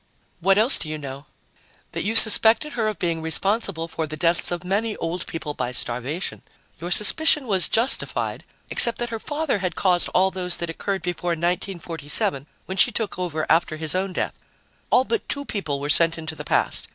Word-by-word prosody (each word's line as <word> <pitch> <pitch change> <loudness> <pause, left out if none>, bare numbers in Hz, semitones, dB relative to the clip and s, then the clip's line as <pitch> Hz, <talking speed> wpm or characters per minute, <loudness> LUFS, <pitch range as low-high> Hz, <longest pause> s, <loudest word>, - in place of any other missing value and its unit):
"What 195 +3 +2
else 225 +6 +4
do 155 - -5
you 155 - -4
know?" 140 -1 -9 0.6
"That - - -4
you 220 +3 -2
suspected 225 +6 +7
her 225 -3 -1
of 215 - -3
being 170 -2 -2
responsible 165 +1 -1
for 160 -1 -4
the 155 +1 -7
deaths 170 +1 +1
of 175 0 -3
many 210 +4 -1
old 170 +2 -4
people 155 -2 -5
by 125 -3 -4
starvation. 125 +8 -4 0.4
Your 175 - -6
suspicion 285 - +4
was 190 -7 0
justified, 235 +4 0 0.3
except 235 - +5
that 240 -1 -4
her 225 - -4
father 295 -3 -2
had 185 -3 -3
caused 180 -2 +1
all 190 +1 +2
those 180 -2 -4
that 170 -1 -4
occurred 195 +3 -4
before 175 0 -2
1947, 165 -5 -2 0.2
when 190 - -6
she 245 - +4
took 215 -4 -4
over 160 -4 -3
after 160 -1 +1
his 155 -1 -2
own 190 +1 -2
death. - - -3 0.6
All 255 - +4
but 445 - -3
two 285 -1 -3
people 155 - -4
were 145 - -4
sent 165 +2 +5
into 160 0 -6
the - - -9
past. - - 0
180 Hz, 190 wpm, -22 LUFS, 160-215 Hz, 0.6 s, suspected